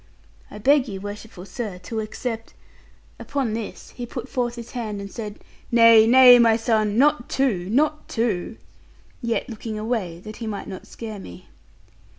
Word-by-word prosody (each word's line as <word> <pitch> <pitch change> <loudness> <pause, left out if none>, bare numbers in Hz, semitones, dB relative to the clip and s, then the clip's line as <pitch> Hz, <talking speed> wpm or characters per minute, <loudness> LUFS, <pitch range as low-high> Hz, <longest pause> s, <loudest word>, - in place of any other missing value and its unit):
I - - -10
beg 275 +4 +3
you, 195 -3 -5
worshipful 205 -1 -8
sir, 200 0 -5
to 220 +4 -4
accept 225 +1 -5 0.3
' - - -31
Upon 270 -6 -2
this 225 -1 -6
he 245 -1 -7
put 245 +1 -6
forth 245 -3 -2
his 235 -1 -9
hand 220 -5 -4
and 200 0 -7
said, 210 -3 -6 0.3
'Nay, 230 -2 +7
nay, 250 0 +9
my 230 -1 +5
son, 220 -2 +1
not 285 -1 +3
two, 205 -10 0
not 300 +6 +1
two:' 225 -2 -1 0.6
yet 235 -2 -1
looking 220 -1 -6
away, 215 -7 -3
that 215 +2 -9
he 230 - -6
might 205 -2 -5
not 190 -2 -8
scare 220 -3 -8
me. 90 - -12
225 Hz, 165 wpm, -23 LUFS, 210-245 Hz, 0.6 s, nay